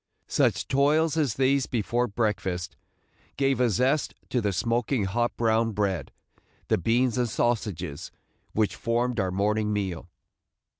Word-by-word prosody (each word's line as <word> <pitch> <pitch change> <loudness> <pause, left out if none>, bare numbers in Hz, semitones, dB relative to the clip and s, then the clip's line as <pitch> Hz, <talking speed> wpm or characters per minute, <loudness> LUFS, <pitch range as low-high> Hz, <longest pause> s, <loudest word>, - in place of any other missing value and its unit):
Such - - +1
toils 150 +4 +3
as 145 -8 +1
these 135 0 +2
before 120 +1 0
breakfast 100 -5 -2 0.6
gave 135 -1 +2
a 125 - +4
zest 130 +7 +1
to 125 - 0
the 105 -2 0
smoking 115 +4 0
hot 120 +5 -1
brown 115 -1 +2
bread, 100 -3 -1 0.6
the - - +3
beans 120 +6 +1
and 120 -1 +1
sausages, 105 -10 -2 0.4
which 105 -3 +1
formed 120 0 0
our 95 - +1
morning 105 +3 0
meal. 95 -4 -3
115 Hz, 135 wpm, -26 LUFS, 100-125 Hz, 0.6 s, a